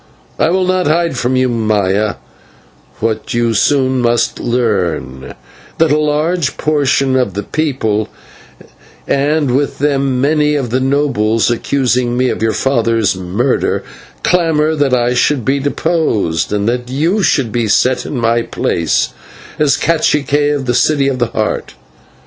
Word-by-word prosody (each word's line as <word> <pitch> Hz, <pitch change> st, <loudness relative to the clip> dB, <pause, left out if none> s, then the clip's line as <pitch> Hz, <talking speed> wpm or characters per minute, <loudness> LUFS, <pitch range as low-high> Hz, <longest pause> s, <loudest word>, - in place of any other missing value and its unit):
I -, -, +3 dB
will 185 Hz, +1 st, +1 dB
not 185 Hz, -2 st, +1 dB
hide 165 Hz, -1 st, +1 dB
from 125 Hz, +1 st, -1 dB
you, 130 Hz, 0 st, +2 dB
Maya, 105 Hz, -3 st, 0 dB, 0.9 s
what 110 Hz, 0 st, -2 dB
you 120 Hz, 0 st, +1 dB
must 110 Hz, -3 st, +1 dB
soon 130 Hz, +2 st, +2 dB, 0.5 s
learn, 90 Hz, -, -2 dB, 0.4 s
that 160 Hz, -2 st, +2 dB
a 150 Hz, -, +3 dB
large 155 Hz, +1 st, 0 dB
portion 140 Hz, -3 st, +1 dB
of 125 Hz, -8 st, 0 dB
the 105 Hz, -, -3 dB
people, 110 Hz, -8 st, -1 dB, 1.0 s
and 145 Hz, -2 st, +1 dB
with 140 Hz, +1 st, -1 dB
them 135 Hz, -2 st, 0 dB
many 150 Hz, +2 st, +2 dB
of 130 Hz, -5 st, -2 dB
the 130 Hz, -, +1 dB
nobles, 130 Hz, -5 st, +1 dB
accusing 125 Hz, -1 st, 0 dB
me 130 Hz, 0 st, +2 dB
of -, -, -3 dB
your 110 Hz, 0 st, +2 dB
father's 115 Hz, -4 st, +1 dB
murder, 95 Hz, +8 st, -1 dB, 0.4 s
clamour 160 Hz, -3 st, +2 dB
that 145 Hz, -4 st, +1 dB
I 120 Hz, 0 st, +1 dB
should 130 Hz, -1 st, +1 dB
be 140 Hz, +1 st, +1 dB
deposed, 145 Hz, -, -1 dB
and 105 Hz, 0 st, -1 dB
that 125 Hz, +1 st, -2 dB
you 165 Hz, +10 st, 0 dB
should 135 Hz, -, +1 dB
be 115 Hz, 0 st, -1 dB
set 125 Hz, +5 st, +2 dB
in 140 Hz, -, -5 dB
my 115 Hz, 0 st, +1 dB
place 85 Hz, -7 st, -1 dB, 0.5 s
as 150 Hz, -2 st, +3 dB
/cacique/ 150 Hz, -2 st, +1 dB
of 135 Hz, -2 st, -4 dB
the 120 Hz, -, 0 dB
City 140 Hz, +3 st, +2 dB
of 130 Hz, -2 st, -3 dB
the 120 Hz, -, +1 dB
Heart. 110 Hz, -1 st, -3 dB
130 Hz, 150 wpm, -14 LUFS, 115-150 Hz, 1.0 s, I